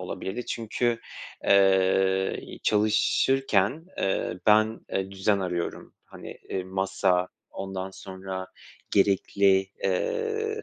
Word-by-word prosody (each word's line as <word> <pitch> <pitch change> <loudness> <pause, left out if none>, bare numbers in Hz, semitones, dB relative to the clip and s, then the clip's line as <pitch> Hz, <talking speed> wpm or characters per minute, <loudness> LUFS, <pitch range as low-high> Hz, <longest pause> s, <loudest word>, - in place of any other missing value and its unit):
olabilirdi. 95 +5 -5
Çünkü, 115 +1 -1 0.4
eee, 95 -1 +3
i - - -11
çalışırken, 110 - +2
eee, 95 -2 -1
ben, 110 +1 +4
eee, 95 0 -1
düzen 100 +1 +1
arıyorum. 90 -2 -4
Hani, - - -11
eee, 95 - -3
masa, 95 -1 0 0.2
ondan 95 0 -5
sonra 95 -1 -7 0.4
gerekli, 100 -1 +3 0.2
eee, 440 - -1
95 Hz, 95 wpm, -26 LUFS, 95-110 Hz, 0.4 s, ben